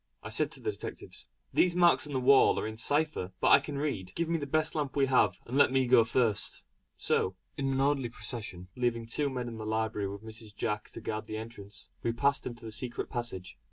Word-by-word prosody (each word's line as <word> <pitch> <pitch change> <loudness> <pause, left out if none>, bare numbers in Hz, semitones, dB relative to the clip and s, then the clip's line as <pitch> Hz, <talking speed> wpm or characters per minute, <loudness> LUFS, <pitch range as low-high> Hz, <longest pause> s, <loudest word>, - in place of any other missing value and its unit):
I - - -6
said - - +1
to - - -5
the 420 - -2
detectives: - - -8 0.3
"These 180 -1 +3
marks 175 -3 +4
on 145 - -7
the 130 - +1
wall 135 +2 +5
are - - -3
in 110 - -4
a - - -13
cipher 145 -7 +1
which - - +3
I - - +9
can 145 -2 -6
read. 115 -11 -3
Give 170 -1 -1
me 165 -1 +1
the 145 - -4
best 155 +2 +1
lamp 150 -4 -2
we 140 -1 +4
have, 110 -8 +3
and 125 - -5
let 145 - +5
me 130 0 +3
go 120 -1 +6
first." 115 -2 +1 0.3
So, 95 - 0 0.2
in 135 -1 -1
an 135 - 0
orderly 135 -3 +1
procession, 105 -5 -6
leaving 120 -2 0
two 140 +5 0
men 125 -2 -4
in 115 -2 -7
the - - -5
library 110 -2 -1
with 100 +2 -8
Mrs. 110 -1 -9
Jack 105 0 -2
to - - -7
guard 110 0 -4
the 110 - -5
entrance, 105 -2 -9
we 115 - 0
passed 140 +3 +1
into 120 -1 -8
the 110 - -6
secret 120 +2 -3
passage. 115 -7 -5
120 Hz, 235 wpm, -30 LUFS, 110-140 Hz, 0.3 s, I